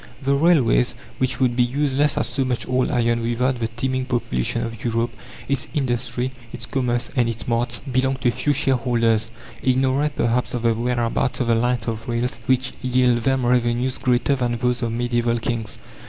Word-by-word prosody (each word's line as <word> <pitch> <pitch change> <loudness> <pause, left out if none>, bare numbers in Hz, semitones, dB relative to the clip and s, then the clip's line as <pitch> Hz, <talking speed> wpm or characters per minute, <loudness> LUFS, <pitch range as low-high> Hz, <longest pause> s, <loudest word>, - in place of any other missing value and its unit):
The 140 0 +1
railways, 140 - +3 0.2
which 130 -3 0
would 125 -2 +2
be 125 - +3
useless 140 +3 +1
as - - +1
so 135 - -1
much 125 -2 -2
old 130 0 +1
iron 115 -1 +1
without 120 +2 0
the 115 - 0
teeming 130 +3 -2
population 115 - -1
of 115 0 -6
Europe, 115 0 0 0.4
its 140 -1 -1
industry, 125 -2 -1 0.2
its 115 - -5
commerce, 120 -2 -1
and 120 -3 +2
its 115 -1 -4
marts, 120 +1 0
belong 130 0 0
to 120 - +3
a - - +2
few 130 +4 0
shareholders, 120 -5 +1 0.3
ignorant 130 +3 +1
perhaps 120 +2 0
of 120 - -3
the 115 -1 +3
whereabouts 120 +1 -1
of - - +1
the 115 - +3
lines 120 0 0
of 115 +1 -4
rails 120 +1 -1
which 130 0 +1
yield 125 -1 +2
them 135 -2 +2
revenues 125 +1 +1
greater 125 +2 +2
than 120 -2 -1
those 125 0 0
of 115 -2 -1
medieval 120 0 0
kings. 115 -1 -3
125 Hz, 185 wpm, -22 LUFS, 115-130 Hz, 0.4 s, railways